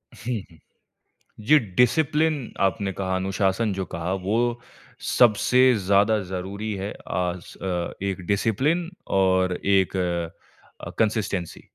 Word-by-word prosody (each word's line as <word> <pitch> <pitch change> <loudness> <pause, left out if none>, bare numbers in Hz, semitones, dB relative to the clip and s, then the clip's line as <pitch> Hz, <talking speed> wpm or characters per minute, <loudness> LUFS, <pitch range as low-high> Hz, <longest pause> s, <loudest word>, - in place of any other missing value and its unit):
हुँ, 125 +2 -4 0.2
हुँ। 80 - -18 0.9
जी, 155 +4 +7
discipline, 140 - +1
आपने 95 0 +1
कहा, 95 0 -2
अनुशासन 95 +3 0
जो 95 -1 -3
कहा, 85 +2 -3
वो 115 +6 0 0.6
सबसे 125 +2 +5
ज़्यादा 100 +3 +4
ज़रूरी 95 +4 -5
है, 100 +1 -4 0.2
आस 90 -1 -3
अ, 90 -2 -2
एक 95 -2 -2
डिसिप्लिन 130 - +1 0.3
और 95 -1 +3
एक 95 -1 +2 0.9
अ, - - -5
कंसिस्टेंसी। 105 -5 -1
100 Hz, 110 wpm, -24 LUFS, 95-120 Hz, 0.9 s, जी